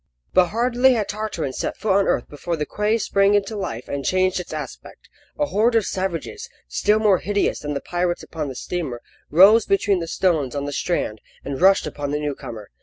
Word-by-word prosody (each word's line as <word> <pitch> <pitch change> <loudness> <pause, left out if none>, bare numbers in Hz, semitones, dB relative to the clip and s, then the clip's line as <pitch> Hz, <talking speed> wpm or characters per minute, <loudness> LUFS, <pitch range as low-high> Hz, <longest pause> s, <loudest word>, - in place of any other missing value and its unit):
But 180 -1 +5
hardly 245 +5 +3
had 215 -4 -1
Tartarin 210 -10 -3
set - - -3
foot 205 -3 +1
on 200 0 +3
earth 120 - 0
before 165 +3 -4
the 150 - -2
quay 210 +7 0
sprang 200 -2 +2
into 205 +2 0
life 120 - -5
and 140 -1 -4
changed 185 +5 +1
its 180 - -7
aspect. - - -8 0.3
A 295 - +1
horde 230 -1 +2
of 225 -3 +3
savages, 190 - -4 0.2
still 210 +1 +2
more 210 -4 +3
hideous 205 +1 0
than 145 0 -4
the 140 - -2
pirates 175 0 -2
upon 155 -3 -5
the 135 - -6
steamer, 135 -5 -4 0.3
rose 200 +8 +6
between 195 -1 +2
the 165 - -4
stones 155 -8 0
on 140 0 -2
the 145 - -4
strand 135 -10 -2 0.2
and 140 +1 -4
rushed 195 +1 +5
upon 145 -1 -4
the 145 +1 -1
new 150 -1 -2
comer. 110 -5 -9
185 Hz, 205 wpm, -22 LUFS, 145-210 Hz, 0.3 s, rose